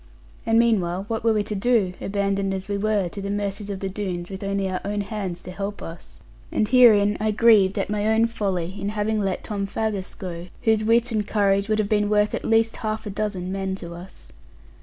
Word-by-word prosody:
And 225 0 +4
meanwhile, 195 -6 +2
what 225 -1 -2
were 230 - +4
we 210 -1 +1
to 210 - -5
do, 205 -2 +2
abandoned 195 -1 -1
as 190 0 -5
we 205 - -2
were 205 -2 +1
to 200 - -7
the 200 - -4
mercies 205 0 -3
of 195 -2 -4
the 195 - -1
Doones, 185 -2 -4
with 190 +1 -6
only 195 0 -1
our 185 -1 -3
own 205 +1 -2
hands 195 -4 -4
to 180 - -7
help 200 +2 -5
us? 165 0 -10 0.3
And 215 - +1
herein 210 -4 +6
I 215 +1 +1
grieved 210 -3 +5
at 195 - 0
my 210 0 -1
own 220 +1 +4
folly, 190 -6 -2
in 200 - -2
having 215 +1 -1
let 195 -2 -1
Tom 200 -2 -3
Faggus 205 -2 -3
go, 175 -2 -6 0.2
whose 220 -1 +3
wit 235 +2 +3
and 210 -2 -1
courage 200 -1 +2
would 215 - +2
have 215 -2 +1
been 210 0 +1
worth 210 0 +2
at - - -3
least 225 0 +2
half 215 0 -3
a 205 - -4
dozen 195 -3 -3
men 190 0 -2
to 170 -3 -8
us. 175 +3 -12
205 Hz, 225 wpm, -24 LUFS, 195-215 Hz, 0.3 s, herein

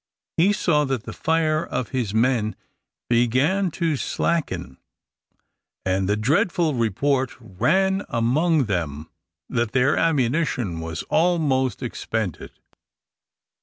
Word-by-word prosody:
He 180 +5 +4
saw 165 -7 +2
that 135 -5 -2
the - - -7
fire 160 -1 +1
of 125 - -3
his 125 -6 -2
men 110 -1 +1 0.5
began 130 - +2
to 165 -3 +1
slacken, 140 - -2 1.1
and 95 0 0
the 105 - +2
dreadful 165 - +1
report 130 +3 0
ran 190 - +1
round - - -7
among 145 +7 +2
them 80 -6 -3 0.4
that 115 -3 -1
their 130 +2 +3
ammunition 130 - 0
was 80 0 -5
almost 145 - +1
expended. 105 -8 -3
130 Hz, 110 wpm, -23 LUFS, 110-160 Hz, 1.1 s, He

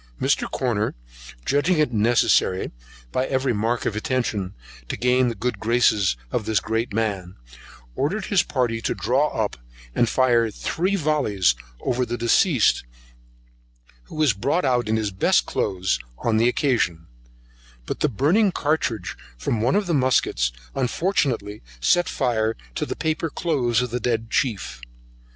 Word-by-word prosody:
Mr. - - +1
Corner - - -1 0.5
judging 160 +5 +2
it 150 -5 +1
necessary, 110 -4 +2 0.4
by 130 +1 0
every 130 -1 0
mark 115 +3 -1
of 105 - -1
attention, 110 -5 -2 0.3
to - - -3
gain 125 +1 +3
the 115 - -2
good 125 +4 -3
graces 110 - +2
of 110 - -1
this 110 -2 +2
great 115 +1 -2
man, 100 -4 -2 0.6
ordered 190 - -1
his 195 -5 +3
party 120 -4 -1
to - - -1
draw 130 +6 +1
up, 110 -7 -2 0.4
and 120 - +2
fire 120 -3 +3
three 180 - -1
vollies 140 - +2 0.3
over 125 +1 0
the 120 0 -3
deceased, 120 - +3 1.2
who - - -12
was 155 -6 +3
brought 140 - 0
out 125 -4 +1
in 110 - +2
his 105 -2 -1
best 95 - +2
new - - -9
cloaths, 95 -6 0 0.2
on 115 -2 0
the 115 +2 +4
occasion; 115 - 0 0.8
but - - -4
the 150 - +2
burning 170 - +3
cartridge 145 - -1 0.2
from 105 - -1
one 120 - +2
of 205 0 +2
the 175 - -1
muskets, 130 - +2 0.2
unfortunately 125 - -1 0.2
set 175 - +3
fire 115 -4 0 0.2
to - - -3
the - - -3
paper 160 +1 -1
cloaths 130 -8 0
of 125 - -4
the 125 - -1
dead 115 -1 -1
chief. 100 - -1
120 Hz, 150 wpm, -23 LUFS, 110-140 Hz, 1.2 s, the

